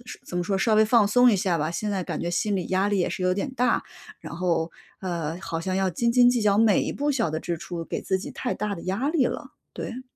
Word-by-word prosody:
说 - - -8
怎 180 - -5
么 175 - +1
说， 195 +2 -1
稍 220 +4 +1
微 215 - +6
放 220 -2 +4
松 245 +4 +5
一 210 - +3
下 180 -2 0
吧， 155 +1 -1
现 210 +4 -3
在 195 -2 -1
感 - - -4
觉 170 - -2
心 200 +3 0
理 180 - -3
压 190 +2 +1
力 205 -1 +1
也 175 - +1
是 - - -4
有 185 0 +2
点 205 +7 -3
大。 250 -1 +2 0.4
然 - - -8
后， 170 -2 0 0.3
呃， 170 -3 -3
好 165 - -3
像 185 +2 -2
要 190 -1 +1
斤 235 +8 0
斤 245 0 +6
计 245 -2 +1
较 205 -1 +3
每 215 -3 +4
一 - - -2
步 290 +1 0
小 230 - +1
的 155 - -2
支 170 +1 -4
出， 170 0 -6
给 - - -4
自 190 -1 0
己 190 - -7
太 250 - -3
大 210 -1 -2
的 170 - -9
压 215 +11 -1
力 290 -7 +2
了， - - -5 0.2
对。 250 +2 -6
195 Hz, 300 characters per minute, -25 LUFS, 175-230 Hz, 0.4 s, 微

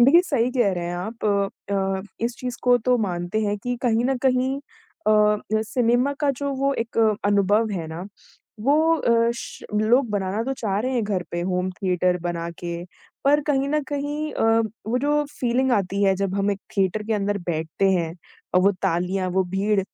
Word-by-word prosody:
देखिए, 275 +8 +7
सही 250 -7 +1
कह 240 -6 +2
रहे 175 -1 -3
हैं 175 - -3
आप 220 +7 -6 0.5
अ, 195 -1 0 0.2
इस 235 0 -2
चीज़ 250 -1 -4
को 245 0 +5
तो 250 +2 +2
मानते 180 0 -1
हैं 205 0 0
कि 245 +4 -3
कहीं 235 -2 +2
न 265 +1 +1
कहीं 260 0 +2 0.5
अ - - +5
अ, 210 0 +2
सिनेमा 245 +4 +1
का 290 - +3
जो 280 +1 -2
वो 275 +1 +1
एक 230 0 -3 0.3
अनुभव 205 +2 +3
है 175 -5 -3
ना, 165 +4 -6 0.5
वो 305 +7 +4
अ, 235 -5 +3
श - - -8
लोग 230 +5 +3
बनाना 205 +1 -1
तो 270 - -1
चाह 205 -5 -1
रहे 255 +3 -1
हैं 240 - +1
घर 200 -3 -1
पे 175 - -2
होम 180 +1 -1
थिएटर 180 -1 0
बनाके। 170 0 -4 0.4
पर 290 +2 +5
कहीं 280 -2 +1
न 300 +1 +1
कहीं 295 +1 -3
अ, - - -2 0.4
वो 245 +3 +1
जो 295 +2 +1 0.2
फीलिंग 255 +1 +2
आती 200 -2 0
है, 195 -1 +4
जब 195 -1 -1
हम 200 +1 +1
एक 200 -1 -3 0.2
थिएटर 195 +2 +1
के 225 - 0
अंदर 205 0 0
बैठते 165 +3 0
हैं, 170 -3 0 0.4
अ, - - +7
वो 195 +2 +4
तालियाँ, 185 +1 0
वो 190 +1 +1
भीड़ 200 +1 +2
210 Hz, 195 wpm, -23 LUFS, 190-250 Hz, 0.5 s, देखिए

